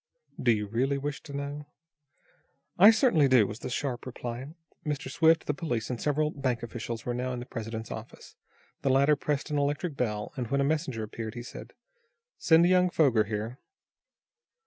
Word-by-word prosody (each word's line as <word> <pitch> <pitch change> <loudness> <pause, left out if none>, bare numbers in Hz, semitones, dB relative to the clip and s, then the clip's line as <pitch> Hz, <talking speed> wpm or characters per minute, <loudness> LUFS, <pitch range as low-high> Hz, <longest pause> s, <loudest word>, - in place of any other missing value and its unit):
"Do 120 - +4
you 105 -2 0
really 130 +7 0
wish 140 0 -4
to 140 -2 -7
know?" 145 +1 -5 1.1
"I 200 +4 +10
certainly 220 - +4
do," 130 -5 +5
was 105 +3 -6
the - - -5
sharp 125 -1 -3
reply. 125 +1 -5 0.4
Mr. 150 -2 -3
Swift, 160 0 +4
the 145 - 0
police 130 -7 -3
and 120 - -4
several 150 +1 +1
bank 130 -5 -2
officials 115 0 -5
were 120 - -1
now 125 +1 -2
in 125 - -4
the 120 - -7
president's 115 -2 -6
office. - - -9 0.5
The 135 - +1
latter 140 +3 +4
pressed 145 +1 -2
an 145 - +1
electric 145 +3 -1
bell, 105 -5 -2
and, 125 -3 -3
when 140 +4 0
a - - +3
messenger 140 -6 -1
answered, 110 +1 -6
he 120 - -6
said: - - -10 0.7
"Send 165 +1 +5
young 180 0 +4
Foger 130 -11 +3
here." 110 +5 -4
135 Hz, 180 wpm, -28 LUFS, 120-150 Hz, 1.1 s, I